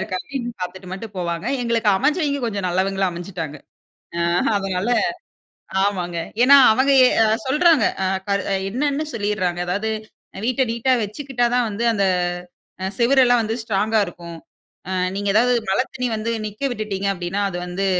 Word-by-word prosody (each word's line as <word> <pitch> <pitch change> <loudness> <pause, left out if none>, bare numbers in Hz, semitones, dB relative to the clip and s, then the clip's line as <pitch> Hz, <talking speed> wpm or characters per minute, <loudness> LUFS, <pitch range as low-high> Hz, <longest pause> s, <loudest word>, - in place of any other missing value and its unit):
இருக்கா 185 - -3
அப்படின்னு 260 -4 -5
பார்த்துட்டு 180 +1 -6
மட்டும் 205 +2 -7
போவாங்க. 170 -2 -3 0.2
எங்களுக்கு 230 -2 +1
அமைஞ்சவிங்க 285 - +1
கொஞ்சம் 200 -5 -2
நல்லவங்களா 190 +1 0
அமைஞ்சுட்டாங்க. 170 -3 -6 0.6
ஆ - - -1 0.4
அதனால 195 +2 -2 0.9
ஆமாங்க. 180 -4 -1 0.3
ஏன்னா 275 +3 +8 0.2
அவங்க 265 +4 +2
எ - - +7 0.4
சொல்றாங்க 300 0 +4 0.9
என்னன்னு 285 +6 -1
சொல்லிடுறாங்க. 205 -5 -1
அதாவது 205 +5 -1 0.6
வீட்ட 255 +2 +1
நீட்‌டா 235 +3 +1
வச்சுக்கிட்டா 245 +4 -2
தான் 245 -2 +2
வந்து 210 +3 -4
அந்த, 200 -2 +1 0.9
சுவர் 265 +3 +4
எல்லாம் 245 -1 +4
வந்து 220 +1 -2
ஸ்ட்ராங்கா 220 +1 +1
இருக்கும். 170 -1 -9 0.5
அ - - -3 0.2
நீங்க 200 0 -1
ஏதாவது 245 +3 +4 0.2
மழை 195 +6 +2
தண்ணீ 250 -1 -2
வந்து 220 +2 -2 0.2
நிக்க 210 +5 -12
விட்டுட்டீங்க 210 -4 -3
அப்படின்னா, 180 +2 -3
அது 175 - -4
வந்து 185 +2 -2
210 Hz, 140 wpm, -21 LUFS, 190-245 Hz, 0.9 s, ஏன்னா